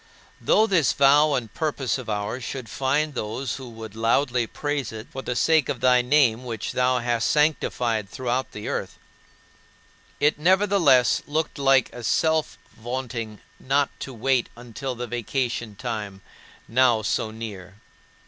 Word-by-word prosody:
Though 215 Hz, -, +4 dB
this 185 Hz, -, +2 dB
vow 145 Hz, +2 st, +5 dB
and 115 Hz, -5 st, -4 dB
purpose 140 Hz, -6 st, -1 dB
of 120 Hz, -3 st, -8 dB
ours 105 Hz, +4 st, -3 dB
should 130 Hz, 0 st, -5 dB
find 145 Hz, +3 st, 0 dB
those 120 Hz, +2 st, -3 dB
who 130 Hz, -2 st, -9 dB
would 110 Hz, -2 st, -10 dB
loudly 120 Hz, +1 st, +1 dB
praise 145 Hz, -3 st, -3 dB
it 110 Hz, +1 st, -8 dB
for 135 Hz, -, -5 dB
the 125 Hz, -, -3 dB
sake 160 Hz, +1 st, +3 dB
of -, -, -2 dB
thy 125 Hz, -1 st, +4 dB
name, 125 Hz, -2 st, +3 dB
which 115 Hz, -3 st, -4 dB
thou 125 Hz, 0 st, +2 dB
hast 120 Hz, -1 st, 0 dB
sanctified 120 Hz, -8 st, +1 dB
throughout 130 Hz, +2 st, -2 dB
the 105 Hz, -, -7 dB
earth -, -, -4 dB, 1.2 s
it 150 Hz, 0 st, +2 dB
nevertheless 180 Hz, -7 st, +4 dB
looked 155 Hz, 0 st, -2 dB
like 135 Hz, -2 st, +3 dB
a 120 Hz, -, -8 dB
self 160 Hz, +6 st, +1 dB, 0.2 s
vaunting 115 Hz, -2 st, -5 dB, 0.2 s
not 140 Hz, +1 st, +1 dB
to 135 Hz, -, -6 dB
wait 125 Hz, +1 st, 0 dB
until 125 Hz, +2 st, -6 dB
the 125 Hz, +1 st, -4 dB
vacation 120 Hz, -1 st, -3 dB
time 105 Hz, -4 st, -5 dB, 0.5 s
now 120 Hz, -2 st, +3 dB
so 110 Hz, -, -1 dB
near. 105 Hz, -4 st, -8 dB
125 Hz, 150 wpm, -24 LUFS, 115-140 Hz, 1.2 s, vow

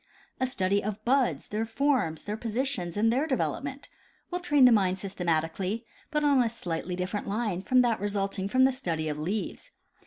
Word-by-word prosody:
A 260 Hz, -, +1 dB
study 200 Hz, -4 st, 0 dB
of 215 Hz, +1 st, -4 dB
buds, 260 Hz, +1 st, +1 dB
their 215 Hz, +1 st, -1 dB
forms, 225 Hz, -, 0 dB
their 210 Hz, -, -3 dB
positions 225 Hz, -5 st, -2 dB
and 225 Hz, +2 st, +3 dB
their 275 Hz, +5 st, +1 dB
development, 275 Hz, 0 st, -2 dB, 0.4 s
will 355 Hz, -, -1 dB
train 295 Hz, -6 st, +4 dB
the 250 Hz, -, +8 dB
mind 190 Hz, -4 st, +3 dB
systematically, 185 Hz, +3 st, -1 dB, 0.2 s
but 300 Hz, -1 st, 0 dB
on 285 Hz, -3 st, +5 dB
a 235 Hz, -, +2 dB
slightly 180 Hz, -5 st, -4 dB
different 185 Hz, +3 st, -3 dB
line 205 Hz, -3 st, -1 dB
from 255 Hz, +5 st, +4 dB
that 235 Hz, -2 st, +1 dB
resulting 195 Hz, -1 st, -1 dB
from 255 Hz, +5 st, +3 dB
the 265 Hz, -, +5 dB
study 165 Hz, -, -2 dB
of 150 Hz, 0 st, -3 dB
leaves. 195 Hz, +7 st, -3 dB
215 Hz, 180 wpm, -28 LUFS, 185-260 Hz, 0.4 s, the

